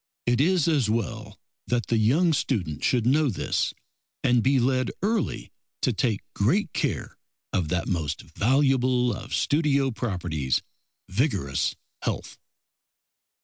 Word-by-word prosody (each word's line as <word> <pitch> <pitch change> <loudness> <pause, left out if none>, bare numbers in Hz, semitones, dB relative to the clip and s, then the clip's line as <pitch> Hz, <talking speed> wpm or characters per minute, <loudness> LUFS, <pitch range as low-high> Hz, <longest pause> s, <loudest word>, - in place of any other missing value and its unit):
It 120 +1 +2
is 175 0 +3
as 145 -9 +2
well 110 -2 -3 0.3
that 120 -1 0
the 115 - +1
young 155 +11 +3
student 90 - -1
should 120 -3 +2
know 145 +3 +3
this, 105 - -1 0.5
and 125 -1 +4
be 135 +2 +3
led 130 +1 +1
early 215 -1 -1 0.3
to - - +2
take 110 -6 0
great 160 - +1
care - - -2 0.3
of 85 -4 +1
that 90 0 -1
most 80 -5 -2
valuable 125 - +2
of - - -8
studio 140 -3 +2
properties, 90 - -1 0.4
vigorous 90 - 0 0.3
health. - - -4
120 Hz, 125 wpm, -26 LUFS, 100-140 Hz, 0.5 s, and